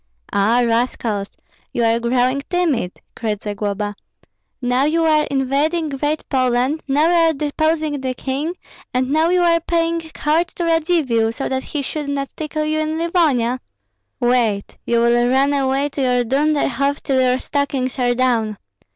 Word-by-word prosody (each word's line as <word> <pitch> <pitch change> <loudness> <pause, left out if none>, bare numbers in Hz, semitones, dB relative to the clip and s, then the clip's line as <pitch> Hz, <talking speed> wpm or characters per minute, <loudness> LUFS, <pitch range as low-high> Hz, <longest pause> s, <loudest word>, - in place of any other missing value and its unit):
"Ah, 225 +5 +3
rascals! 230 -3 -1 0.4
you 240 - -1
are 230 0 +3
growing 250 +3 +1
timid," 315 - 0 0.2
cried 215 -3 -2
Zagloba. 205 0 -3 0.7
"Now 250 +1 +1
you 325 +2 +2
are 305 -1 +3
invading 285 +5 0
Great 290 +2 -2
Poland, 255 +3 +1
now 290 +3 +3
you 345 - +3 0.2
are - - +1
deposing 305 0 -1
the 260 -1 -2
king, 280 +7 -3 0.4
and 255 +1 +1
now 315 +3 +3
you 360 0 +3
are 335 -1 +4
paying 335 0 0
court 320 +3 +1
to 345 - -2
Radzivill, 315 -9 +2
so 230 - -4
that 265 0 -1
he 285 +1 -4
should 295 +1 -4
not 275 -1 -3
tickle 305 0 -3
you 310 0 0
in 310 0 -1
Livonia. 300 -8 +1 0.6
Wait! 240 -5 +1
you 235 0 +2
will 240 +1 +3
run 270 +2 +3
away 275 0 +1
to 280 - -4
your 250 -1 +2
Dunderhoff 280 +1 0
till 265 -2 +1
your 255 0 +3
stockings 270 -2 -2
are 245 -1 +2
down. 230 -4 +1
270 Hz, 160 wpm, -19 LUFS, 245-310 Hz, 0.7 s, are